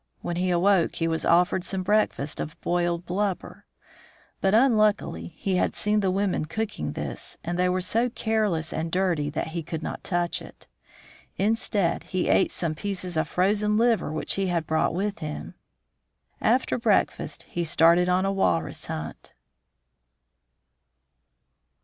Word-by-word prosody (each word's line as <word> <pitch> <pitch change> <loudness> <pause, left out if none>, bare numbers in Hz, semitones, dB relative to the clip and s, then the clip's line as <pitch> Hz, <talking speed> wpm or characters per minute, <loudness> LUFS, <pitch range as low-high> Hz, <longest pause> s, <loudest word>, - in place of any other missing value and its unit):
When 175 - -3
he 185 +1 0
awoke 180 0 +3
he 165 - 0
was 160 0 -1
offered 180 +2 +3
some 185 +1 -2
breakfast 190 -8 +1
of 155 - -5
boiled 175 0 0
blubber. 195 +1 -3 0.7
But, 195 +2 +3
unluckily, 215 - +2
he 190 -2 0
had - - 0
seen 210 0 +1
the 195 -2 +1
women 190 -4 0
cooking 155 - -3
this, - - -4
and 175 +1 -3
they 180 0 +3
were 185 +1 0
so 230 +7 +1
careless 215 -9 -1
and 165 +1 -3
dirty 175 -5 +1
that 155 +2 -3
he 170 +1 -3
could 160 0 -5
not - - -5
touch 175 -1 0
it. - - -13 0.7
Instead 210 -3 0
he 185 -1 -1
ate - - +4
some 165 -3 -2
pieces 185 0 -4
of 160 -1 +1
frozen 210 +5 +1
liver 230 -7 +2
which 155 - 0
he 195 -1 0
had 170 -3 0
brought 160 +1 +1
with 200 0 -2
him. 150 -2 -6 0.9
After 250 +2 +2
breakfast 225 -4 0
he 175 - -3
started 170 +2 +4
on 185 +1 +2
a 195 - +1
walrus 85 - 0
hunt. 75 0 -6
180 Hz, 150 wpm, -26 LUFS, 165-205 Hz, 0.9 s, ate